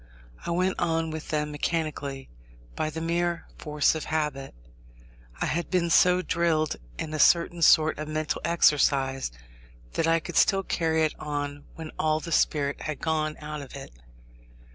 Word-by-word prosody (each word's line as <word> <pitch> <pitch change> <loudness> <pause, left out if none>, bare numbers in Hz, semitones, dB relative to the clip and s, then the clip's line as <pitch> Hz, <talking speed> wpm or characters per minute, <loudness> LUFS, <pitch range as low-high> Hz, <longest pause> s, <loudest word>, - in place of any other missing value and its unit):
I - - -2
went 185 +2 0
on 165 -1 0
with 160 0 -6
them 150 -1 -1
mechanically, 145 -3 -3 0.5
by 155 - -1
the 160 +1 -5
mere 170 +1 -1
force 150 -1 +2
of 160 - -4
habit. 150 -4 -2 0.8
I - - 0
had 170 +2 -2
been 175 -2 +1
so 180 +2 +5
drilled 165 -3 +1 0.2
in 155 - -5
a 155 - -3
certain 170 +1 +4
sort 155 -1 +5
of 155 - -4
mental 155 0 -2
exercise, 140 - +2 0.6
that 165 - 0
I 165 0 +4
could - - -5
still 195 0 +4
carry 160 -3 +1
it 155 - +1
on 145 -1 -4
when 160 -1 -7
all 155 0 +2
the 170 +1 -7
spirit 145 -3 +1
had 155 -2 -4
gone 155 -1 -1
out 150 0 -5
of 140 - -10
it. 135 - -9
155 Hz, 165 wpm, -27 LUFS, 150-170 Hz, 0.8 s, so